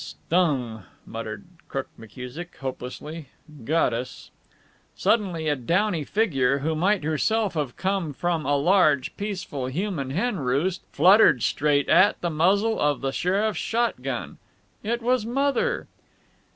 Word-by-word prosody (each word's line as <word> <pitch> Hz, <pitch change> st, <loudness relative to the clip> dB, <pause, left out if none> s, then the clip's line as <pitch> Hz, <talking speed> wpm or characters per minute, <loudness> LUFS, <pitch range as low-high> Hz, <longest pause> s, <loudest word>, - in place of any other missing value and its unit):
"Stung!" 130 Hz, -, -1 dB, 0.2 s
muttered 110 Hz, -2 st, -6 dB, 0.2 s
Crook 135 Hz, -1 st, -4 dB
McKusick, 125 Hz, +10 st, -9 dB
hopelessly. 135 Hz, +4 st, -7 dB, 0.4 s
"Got 155 Hz, -1 st, +2 dB
us." 120 Hz, +2 st, -6 dB, 0.6 s
Suddenly 185 Hz, -8 st, 0 dB
a 150 Hz, -, +2 dB
downy 170 Hz, -, 0 dB
figure 140 Hz, -, +1 dB
who 155 Hz, +4 st, -1 dB
might 185 Hz, +3 st, +1 dB
herself 200 Hz, +8 st, 0 dB
have 150 Hz, -6 st, -3 dB
come 190 Hz, -4 st, -1 dB
from 165 Hz, +2 st, -1 dB
a 145 Hz, 0 st, +1 dB
large, 150 Hz, -4 st, +3 dB
peaceful 185 Hz, -10 st, -4 dB
human 155 Hz, -1 st, -3 dB
hen 200 Hz, -, -1 dB
roost 145 Hz, +8 st, 0 dB
fluttered 180 Hz, -, +5 dB
straight 145 Hz, -1 st, +1 dB
at 205 Hz, +3 st, +5 dB
the 175 Hz, -, -2 dB
muzzle 200 Hz, +8 st, +2 dB
of 145 Hz, -1 st, +1 dB
the 135 Hz, 0 st, -1 dB
sheriff's 200 Hz, +7 st, 0 dB
shot 235 Hz, +1 st, -1 dB
gun. -, -, -5 dB, 0.4 s
It 235 Hz, +2 st, -2 dB
was 250 Hz, -1 st, +2 dB
Mother. 280 Hz, -, 0 dB
165 Hz, 130 wpm, -25 LUFS, 135-200 Hz, 0.6 s, fluttered